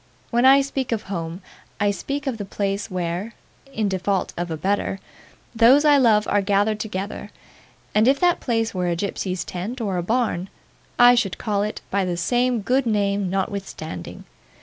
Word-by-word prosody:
When 240 +1 +3
I 270 +1 +7
speak 270 -2 -3
of 220 -2 -1
home, 170 -1 -5 0.4
I 205 0 +2
speak 280 +7 -4
of 255 -5 -3
the - - -3
place 200 +1 -3
where 180 +4 -3 0.4
in 220 -5 -1
default 190 0 -1
of 175 0 -3
a 160 - -3
better 195 +3 -1 0.5
those 245 +6 +5
I 295 -1 +6
love 215 -4 +4
are 205 - +2
gathered 205 +2 +1
together; 205 -2 -5 0.6
and 215 +2 +4
if 275 +1 +4
that 355 -1 +3
place 225 -2 -1
were 180 -1 -1
a 170 - 0
gypsy's 185 -1 -3
tent, 205 +9 -5
or 200 -5 -2
a - - 0
barn, 205 -2 -1 0.5
I 245 0 +8
should 200 -6 0
call 205 -2 -1
it 210 +1 -3
by 200 0 +1
the 180 -2 -2
same 245 +6 +1
good 255 +4 +1
name 200 -3 0
notwithstanding. 190 - -5
205 Hz, 175 wpm, -22 LUFS, 190-235 Hz, 0.6 s, I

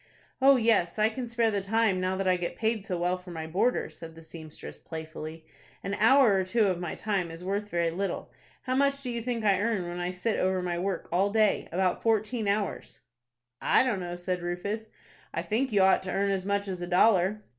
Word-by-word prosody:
"Oh, 275 +1 +7
yes, 220 -8 +2
I 215 +1 +3
can 245 +2 -5
spare 230 -1 +1
the 200 -1 -1
time, 200 -1 +1
now 185 +1 -1
that 195 0 -1
I 185 - +4
get 175 -1 -4
paid 220 -2 -1
so 185 -2 -3
well 180 +1 0
for 180 0 -13
my 160 -2 -5
boarder," 190 +10 +1
said 165 -1 -11
the 165 - -13
seamstress, 160 -1 -10
playfully. 160 0 -8 0.4
"An 195 - -3
hour 235 0 +6
or 190 -1 +2
two 215 +4 +2
of 185 -3 0
my 175 -2 -4
time 195 -5 -1
is 165 +2 -9
worth 200 +2 -2
very 170 -2 0
little. 195 +4 -3 0.3
How 255 -1 -1
much 280 +1 +1
do 250 - -3
you 235 -1 -3
think 235 -2 -3
I 200 -2 +3
earn 205 -5 0
when 175 0 -5
I 175 0 -2
sit 185 +5 -2
over 185 0 +1
my 175 -1 -2
work 190 -1 -2
all 190 +4 +2
day,—about 195 -4 +1
fourteen 220 0 0
hours?" 200 0 -2 0.6
"I - - +4
don't 240 -7 0
know," 175 -1 -5
said 180 0 -3
Rufus. 200 +6 -3 0.5
"I - - -1
think 240 +5 -1
you 200 -2 +4
ought 190 - +4
to 190 - -5
earn 200 +1 +1
as 190 -1 -2
much 200 0 0
as 185 -2 -4
a 175 - -4
dollar." 190 +2 +3
195 Hz, 220 wpm, -28 LUFS, 175-220 Hz, 0.6 s, Oh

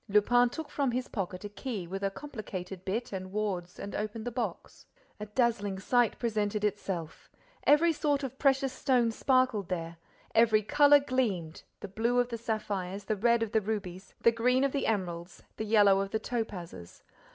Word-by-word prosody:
Lupin 240 +4 +4
took 315 +3 -7
from 280 -3 0
his 250 +1 -2
pocket 185 -2 -4
a 205 - -5
key 205 -3 -5
with 195 +3 -5
a 195 - +2
complicated 195 -7 -7
bit 215 +4 -3
and 185 -1 -5
wards 190 -4 -3
and 200 - -7
opened 215 +2 -4
the 245 - -2
box. 245 +1 -5 0.3
A 210 - -6
dazzling 210 -3 0
sight 240 +4 +2
presented 210 -2 -1
itself. 190 -6 -3 0.4
Every 330 +3 +5
sort 290 -2 0
of 265 0 -5
precious 270 -1 +2
stone 250 -3 +2
sparkled 255 -5 +1
there, 170 -2 -4 0.4
every 220 -1 +4
color 290 +6 +6
gleamed, 225 - -1 0.2
the - - -5
blue 230 +5 0
of 245 0 +2
the 230 -1 -4
sapphires, 205 -4 -3
the 215 +2 -1
red 235 +3 +3
of 220 - -4
the 220 - +2
rubies, 195 -3 -5
the 230 - +5
green 250 +3 +2
of 275 - +2
the 280 - -1
emeralds, 175 -4 -3
the 220 - -3
yellow 205 -3 +5
of 195 0 -2
the 220 - -1
topazes. 180 - -5
215 Hz, 180 wpm, -30 LUFS, 195-245 Hz, 0.4 s, color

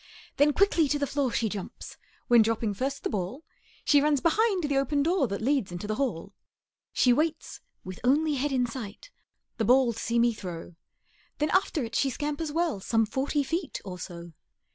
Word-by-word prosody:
Then 290 +1 +5
quickly 350 -2 +3
to 290 - +1
the 285 - 0
floor 280 -2 -1
she 230 - 0
jumps; 205 -2 -7 0.3
When, 240 -1 +6
dropping 225 -1 0
first 270 +7 -3
the - - -1
ball, 210 - -3 0.4
She 290 -2 +5
runs 295 -1 +2
behind 385 - +2
the 290 -2 0
open 280 +1 +1
door 335 -3 +2
That 200 +1 -4
leads 265 -7 +1
into 175 +3 -6
the 215 - -1
hall. 210 -8 -2 0.6
She 250 - +4
waits, 315 +4 -2 0.2
with 185 -1 -8
only 295 +5 +3
head 285 +1 -1
in 255 -2 +2
sight, 240 - -8 0.5
The 225 - 0
ball 250 +1 +4
to 230 - -8
see 235 +1 -1
me 235 0 +4
throw; 175 -4 -7 0.6
Then 300 0 0
after 360 -6 +1
it 230 0 -6
she 275 - +2
scampers 295 +3 -3
well 330 - 0
Some 225 +3 +1
forty 275 +6 -1
feet 330 +4 -3
or 180 -2 -7
so. 170 -1 -8
265 Hz, 190 wpm, -28 LUFS, 220-295 Hz, 0.6 s, When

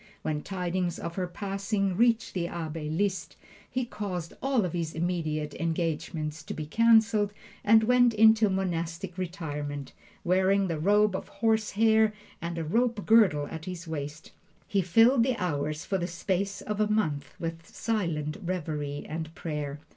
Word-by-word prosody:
When 150 -1 -1
tidings 180 -1 -2
of 170 - -5
her 180 0 -2
passing 195 +1 -2
reached 230 +2 +2
the 175 -2 -1
Abbe 160 -3 -4
Liszt, 190 +4 -1 0.3
he 255 -1 -1
caused 185 -7 -5
all 265 -6 +2
of 175 - -4
his 165 -2 -3
immediate 160 -3 -1
engagements 160 -2 -2
to 155 - -6
be 155 - -4
canceled 220 +2 +4 0.3
and 220 +1 +6
went 245 0 +4
into 220 0 +6
monastic 175 -1 -2
retirement, 150 -6 -5 0.3
wearing 190 +2 +3
the 160 -2 -2
robe 205 +3 +3
of - - -4
horsehair 220 0 +2 0.3
and 170 +1 -4
a 165 - -1
rope 230 +5 0
girdle 200 -11 +5
at 160 0 -6
his 180 -2 -6
waist. 150 0 -6 0.4
He 200 - +2
filled 225 +8 +5
the 250 0 +1
hours 155 -4 -2
for 195 - -1
the 175 - -1
space 195 +3 -2
of 210 -1 -4
a 210 - +3
month 155 -10 -1
with 165 0 -5
silent 170 -9 -2
reverie 150 -5 -3
and 160 0 -5
prayer. 150 -3 -4
180 Hz, 155 wpm, -28 LUFS, 160-210 Hz, 0.4 s, and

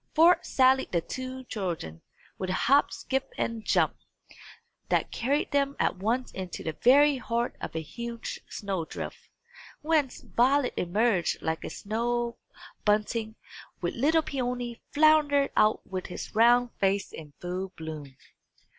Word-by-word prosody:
Forth 335 +3 +5
sallied 265 0 +3
the 170 - +1
two 260 +6 -6
children, 170 - -4 0.4
with 185 - -3
a - - 0
hop 280 +8 +3
skip 265 0 -3
and 230 -2 -2
jump, - - +2 0.9
that - - +1
carried 275 +5 0
them 280 -1 +1
at - - +1
once 230 +7 -1
into 185 -2 -6
the 160 - -3
very 285 +3 +6
heart 235 -1 -2
of - - -6
a 160 - -2
huge 235 +7 -6
snow 195 -5 -3
drift, - - -8 0.5
whence 300 -4 +1
Violet 260 +2 +2
emerged 190 0 +1
like 160 0 -2
a - - -4
snow 235 +2 -2 0.4
bunting, 215 +1 0 0.5
while 175 - -1
little 315 +6 +2
Peony 245 -4 -3
floundered 295 -2 +4
out 215 0 +3
with 185 -1 -5
his - - -7
round 240 +2 +5
face 195 0 +1
in 150 -2 -10
full 185 +2 -4
bloom. 150 -4 -8
235 Hz, 140 wpm, -28 LUFS, 190-265 Hz, 0.9 s, very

